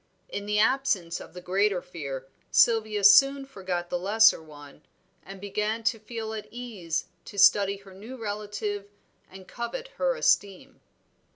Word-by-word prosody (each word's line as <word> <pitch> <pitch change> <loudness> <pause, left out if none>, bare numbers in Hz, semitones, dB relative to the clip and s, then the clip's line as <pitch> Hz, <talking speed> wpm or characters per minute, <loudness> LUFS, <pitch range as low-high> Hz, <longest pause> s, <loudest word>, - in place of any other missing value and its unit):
In 205 0 -5
the 210 0 0
absence 215 -7 +1
of - - -12
the 180 - -8
greater 195 +2 +1
fear, 140 -7 -7 0.2
Sylvia 220 -3 +3
soon 275 +8 +6
forgot 185 -8 -5
the 175 - -1
lesser 220 +2 +4
one, 145 -2 -14 0.4
and 195 +1 -10
began 210 +3 -2
to 225 0 0
feel 220 0 -6
at 215 -1 -6
ease 220 -10 -4 0.2
to 205 - -11
study 200 0 +5
her 195 -1 -16
new 220 +7 -10
relative 205 -2 -4 0.4
and 190 0 -13
covet 475 - -6
her - - +1
esteem. 200 - 0
205 Hz, 150 wpm, -27 LUFS, 185-225 Hz, 0.4 s, soon